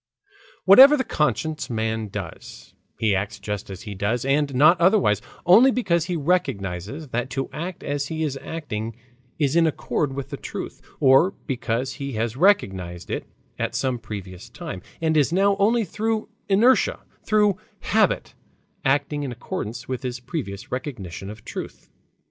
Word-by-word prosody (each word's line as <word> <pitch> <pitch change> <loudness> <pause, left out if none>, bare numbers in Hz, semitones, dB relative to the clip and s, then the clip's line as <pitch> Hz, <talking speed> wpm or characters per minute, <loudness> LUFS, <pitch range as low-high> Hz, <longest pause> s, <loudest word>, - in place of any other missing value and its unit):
Whatever 265 +10 +9
the 260 - 0
conscious 150 - -1
man 110 -1 -1
does, 95 -5 -8 0.2
he 110 -2 +2
acts 100 +3 -2
just 105 -1 -5
as 95 +2 -8
he 105 -3 -6
does, 105 +6 -1
and 140 0 +1
not 155 +6 +6
otherwise, 170 - +4 0.2
only 220 +10 +7
because 175 -10 +1
he 180 0 -2
recognizes 140 - -1
that 120 +1 -2
to 135 0 -3
act 175 +3 -5
as 145 0 -2
he 160 -1 -3
is 145 -3 -1
acting 115 -9 -5 0.4
is 145 -1 +1
in 170 -1 +5
accord 150 -2 -1
with 140 0 -5
the 140 - -4
truth, - - -7 0.2
or 140 +8 +5
because 130 -1 -2
he 140 0 -5
has 115 +1 -2
recognized 95 - +1
it - - -3 0.3
at - - -2
some 130 -2 0
previous 100 -5 -8
time, 90 - -7 0.2
and 160 -1 +1
is 150 0 +3
now 195 +3 +3
only 220 +3 +3
through 220 +4 -2 0.2
inertia, 245 - +4 0.2
through 210 -3 +3 0.2
habit, 215 -2 +1 0.5
acting 145 +2 +1
in 140 -3 -3
accordance 120 0 -5
with 130 -1 -3
his 125 -2 -4
previous 120 - -6
recognition 100 - -5
of 105 0 -10
truth. - - -8
135 Hz, 155 wpm, -24 LUFS, 110-170 Hz, 0.5 s, Whatever